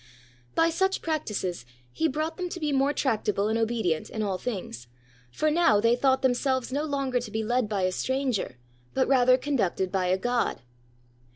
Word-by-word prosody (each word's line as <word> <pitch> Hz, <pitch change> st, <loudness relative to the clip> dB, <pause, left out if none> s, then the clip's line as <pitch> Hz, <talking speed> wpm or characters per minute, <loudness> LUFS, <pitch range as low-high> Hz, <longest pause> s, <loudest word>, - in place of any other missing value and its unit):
By 330 Hz, 0 st, +3 dB
such 380 Hz, +3 st, 0 dB
practices, 210 Hz, -, -2 dB, 0.3 s
he 320 Hz, -, +1 dB
brought 310 Hz, +3 st, -2 dB
them 360 Hz, -1 st, -4 dB
to 350 Hz, -, -6 dB
be 300 Hz, -2 st, -1 dB
more 275 Hz, +1 st, +2 dB
tract 230 Hz, -7 st, 0 dB
able 205 Hz, +1 st, +1 dB
and 225 Hz, +1 st, +1 dB
obedient 220 Hz, -8 st, 0 dB
in 220 Hz, -, -3 dB
all 195 Hz, -3 st, -2 dB
things; 180 Hz, -, -5 dB, 0.4 s
for 305 Hz, -, 0 dB
now 300 Hz, -11 st, +4 dB
they 230 Hz, +3 st, +4 dB
thought 265 Hz, +1 st, +2 dB
themselves 260 Hz, 0 st, +1 dB
no 290 Hz, +2 st, 0 dB
longer 275 Hz, -4 st, 0 dB
to 245 Hz, -, -7 dB
be 220 Hz, 0 st, -2 dB
led 240 Hz, 0 st, 0 dB
by 200 Hz, -3 st, -1 dB
a 185 Hz, -, +2 dB
stranger, 260 Hz, -, -1 dB, 0.4 s
but 265 Hz, -, +2 dB
rather 255 Hz, -1 st, +5 dB
conducted 200 Hz, -10 st, -1 dB
by 185 Hz, -2 st, 0 dB
a 185 Hz, +1 st, +2 dB
god. 245 Hz, -, -1 dB
245 Hz, 185 wpm, -27 LUFS, 205-280 Hz, 0.4 s, rather